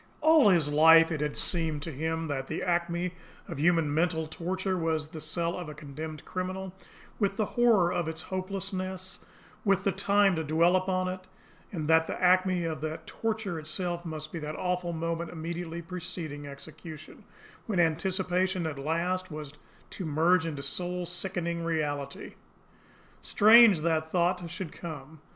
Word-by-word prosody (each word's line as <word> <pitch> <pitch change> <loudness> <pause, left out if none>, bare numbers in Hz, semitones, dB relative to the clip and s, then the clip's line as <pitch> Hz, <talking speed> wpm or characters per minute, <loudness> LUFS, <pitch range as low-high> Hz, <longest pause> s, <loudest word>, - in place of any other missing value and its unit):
All 310 -6 +6
his 170 -6 +4
life 160 +3 +7
it 155 -2 -2
had 150 -1 -2
seemed 160 -4 0
to 165 - -4
him 160 +3 -2
that 135 -2 -3
the 160 - -3
acme 175 0 0 0.3
of - - -6
human 165 -2 +3
mental 160 0 +1
torture 185 +4 -2
was 160 -3 -1
the 155 -1 -8
cell 170 +2 -2
of 175 -3 -6
a 150 - -8
condemned 155 +1 -7
criminal, 185 0 -4 0.5
with 200 -2 +1
the 215 - +1
horror 215 -7 +3
of 170 - -1
its 160 0 -4
hopelessness, 185 -1 -5 0.4
with 195 -2 +2
the 195 - +2
time 195 0 +3
to 160 - -1
dwell 165 +4 +3
upon 185 0 +1
it; 185 0 -5 0.4
and 160 -5 -3
that 160 0 +4
the - - -4
acme 185 0 +3
of 160 -3 -3
that 155 +1 -4
torture 220 -6 -3
itself 170 +3 -2
must 155 -2 -6
be 170 - -5
that 150 0 -5
awful 180 -1 -1
moment 165 0 -3
immediately 170 0 -5
preceding 160 -4 -5
execution, 155 +2 -10 0.4
when 205 -5 0
anticipation 180 +2 +1
at 150 -3 -4
last 175 +5 -1
was 150 -3 -7 0.4
to 190 - -5
merge 165 +2 +2
into 145 -3 -4
soul 180 +2 -2
sickening 175 -1 -3
reality. 145 -4 -3 0.9
Strange 215 -4 +7
that 160 -1 0
thought 175 -1 +1
should 170 -1 -6
come! 155 -2 -9
170 Hz, 160 wpm, -29 LUFS, 155-185 Hz, 0.9 s, life